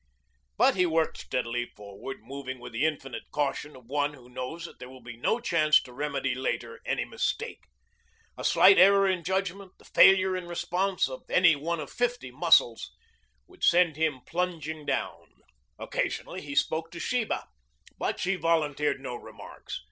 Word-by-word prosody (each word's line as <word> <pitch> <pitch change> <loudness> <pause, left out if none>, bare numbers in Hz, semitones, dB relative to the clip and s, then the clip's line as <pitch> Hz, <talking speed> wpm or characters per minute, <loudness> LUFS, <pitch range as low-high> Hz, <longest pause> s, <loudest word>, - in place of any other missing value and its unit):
But - - +5
he 180 -1 +3
worked 160 -1 0
steadily 120 -1 -2
forward, 105 +6 -10
moving 135 -2 -7
with 125 0 -10
the 130 +7 +2
infinite 135 -5 -5
caution 145 0 -2
of 125 -2 -15
one 145 +3 -1
who 125 -3 -17
knows 130 +7 -6
that - - -12
there 125 0 -9
will 130 -1 -14
be 120 0 -9
no 220 - 0
chance 155 -9 +4
to 125 - -13
remedy 140 -1 -2
later 130 +1 -3
any - - 0
mistake. - - -3 0.7
A - - -8
slight 195 +1 +6
error 195 +1 +6
in 185 -2 0
judgment, 190 +1 -2
the - - -21
failure 190 -1 +6
in 180 -1 -5
response 180 +2 0
of 130 -1 -9
any 175 -3 +5
one 165 +4 -3
of 145 - -7
fifty 245 - -2
muscles, 135 -5 +3 0.6
would - - -17
send 170 -3 +4
him 155 -4 0
plunging 160 -4 -3
down. - - -4 0.3
Occasionally - - -3
he 140 -1 -7
spoke 160 +2 0
to 170 - -9
Sheba, 245 +1 -1 0.5
but - - -2
she 190 +1 0
volunteered 150 -4 +1
no 130 -2 -6
remarks. - - -9
155 Hz, 165 wpm, -28 LUFS, 130-180 Hz, 0.7 s, slight